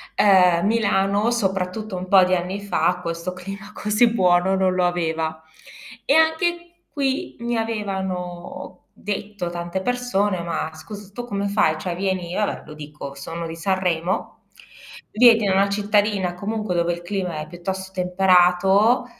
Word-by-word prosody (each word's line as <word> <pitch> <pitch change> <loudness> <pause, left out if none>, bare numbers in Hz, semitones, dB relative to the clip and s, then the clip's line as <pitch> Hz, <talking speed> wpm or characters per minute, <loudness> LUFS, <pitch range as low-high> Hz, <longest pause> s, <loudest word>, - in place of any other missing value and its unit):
ehm, 180 -3 +5
Milano, 205 -1 +2
soprattutto 195 -1 -2
un 185 +1 -5
po' 190 -1 +6
di 185 0 +2
anni 185 +3 -3
fam 180 -3 0
questo 170 +2 -4
clima 195 +3 -9
così 210 +3 +2
buono 185 -2 +3
non 190 -1 +2
lo 180 -1 +1
aveva. 160 -2 -2 0.6
E 280 - +3
anche 345 +2 +1
qui 270 -2 -2
mi 235 0 -2
avevano 190 -5 -5
detto 205 -3 -5
tante 175 +2 -4
persone: 205 -6 0
"Ma 165 -2 -3
scusa 200 +5 -11
tu 240 +2 -6
come 200 -3 -2
fai? 200 -6 +2
Cioè 180 -2 -3
vieni" 185 -2 -2
io 210 - 0
va - - -1
beh, - - -13
lo 155 - -10
dico, 150 -2 -9
sono 165 +4 -6
di 165 - -7
Sanremo, 180 0 -2 0.7
"vieni 230 -1 +6
da 190 - +2
una 195 +1 +3
cittadina, 205 -2 +1
comunque, 210 +1 -3
dove 170 0 +1
il 175 - -7
clima 180 -4 -3
è 155 - -6
piuttosto 190 +2 -5
temperato, 185 +5 +3
190 Hz, 155 wpm, -22 LUFS, 175-210 Hz, 0.7 s, po